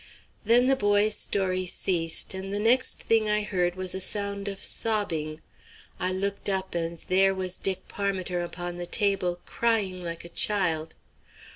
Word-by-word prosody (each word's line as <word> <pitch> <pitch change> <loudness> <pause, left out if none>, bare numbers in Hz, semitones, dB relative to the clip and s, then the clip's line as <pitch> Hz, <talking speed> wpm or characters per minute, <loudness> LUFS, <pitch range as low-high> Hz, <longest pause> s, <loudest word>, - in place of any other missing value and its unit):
Then 235 +3 +5
the 270 +1 +4
boy's 205 -2 +3
story 185 -3 0
ceased, 170 -2 +1
and 190 +1 -4
the 205 - -1
next 240 +4 +3
thing 220 -1 +3
I 210 0 +2
heard 180 -4 0
was 185 -1 -4
a 190 - -3
sound 200 +1 -1
of 195 -1 -4
sobbing. 165 -9 -1 0.6
I 185 +1 0
looked 200 +2 -2
up, 190 -1 -1
and 170 0 -2
there 195 +1 +4
was 185 -1 -3
Dick 190 -1 -2
Parmiter 190 -3 -2
upon 175 0 -5
the 175 0 -4
table, 190 -4 +1
crying 210 -6 0
like 170 -1 -5
a - - -9
child. 165 -5 0
190 Hz, 160 wpm, -27 LUFS, 175-205 Hz, 0.6 s, Then